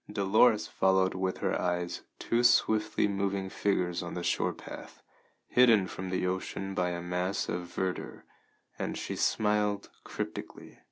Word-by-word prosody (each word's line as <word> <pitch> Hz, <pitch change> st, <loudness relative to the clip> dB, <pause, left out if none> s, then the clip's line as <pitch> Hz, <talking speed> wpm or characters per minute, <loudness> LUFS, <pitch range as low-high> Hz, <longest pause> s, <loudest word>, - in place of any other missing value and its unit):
Dolores 105 Hz, +2 st, +4 dB
followed 95 Hz, 0 st, +2 dB
with 95 Hz, 0 st, -2 dB
her -, -, 0 dB
eyes 90 Hz, -1 st, -1 dB, 0.2 s
two 115 Hz, -, 0 dB
swiftly 110 Hz, -4 st, +3 dB
moving 100 Hz, -1 st, -1 dB
figures 90 Hz, -3 st, 0 dB
on 85 Hz, -, -6 dB
the 90 Hz, -, -4 dB
shore -, -, +1 dB
path, -, -, -11 dB, 0.4 s
hidden 115 Hz, -6 st, +5 dB
from 95 Hz, 0 st, -6 dB
the 90 Hz, 0 st, -1 dB
ocean 95 Hz, +1 st, -3 dB
by 90 Hz, -2 st, 0 dB
a 85 Hz, 0 st, -3 dB
mass 90 Hz, +2 st, -1 dB
of 90 Hz, 0 st, -3 dB
verdure, 95 Hz, +1 st, -4 dB, 0.6 s
and -, -, -3 dB
she -, -, -4 dB
smiled 105 Hz, -1 st, +1 dB
cryptically. -, -, -7 dB
95 Hz, 145 wpm, -30 LUFS, 90-105 Hz, 0.6 s, hidden